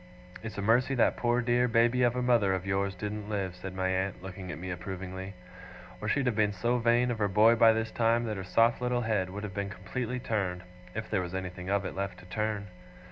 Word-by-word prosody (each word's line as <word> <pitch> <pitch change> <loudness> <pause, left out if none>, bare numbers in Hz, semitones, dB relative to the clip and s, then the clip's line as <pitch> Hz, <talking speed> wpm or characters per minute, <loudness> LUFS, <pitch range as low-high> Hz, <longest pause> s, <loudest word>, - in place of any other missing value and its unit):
'It's 110 -2 -7
a 100 - -2
mercy 125 +5 +3
that 120 - +3
poor 120 0 +1
dear 120 0 +2
baby 120 +1 +3
of 120 0 +3
a 125 - 0
mother 115 -6 +3
of 95 0 -4
yours 100 0 0
didn't 105 +2 -5
live,' 95 -4 -2
said 95 +1 -7
my 95 0 0
aunt, 95 0 -1
looking 95 -1 -7
at - - -6
me 90 +2 -5
approvingly, 95 +1 -6 0.7
'or - - -3
she'd 140 -2 +1
have 125 -3 +1
been 105 -1 +2
so 120 +4 0
vain 120 +1 +3
of 115 - -3
her 105 - +2
boy 105 +4 +5
by 115 -1 +6
this 110 0 -1
time, 115 0 +2
that 110 -2 -2
her 95 - -5
soft 115 +6 +3
little 125 0 0
head 105 -5 0
would 100 +3 -6
have 100 -2 -5
been 100 0 -3
completely 120 +6 -4
turned, 95 -7 -2 0.3
if 110 0 -4
there 95 - 0
was 90 0 -5
anything 90 0 -5
of 100 0 +1
it - - -4
left 100 0 -3
to 90 - -14
turn. 105 +2 -2
105 Hz, 240 wpm, -30 LUFS, 95-115 Hz, 0.7 s, by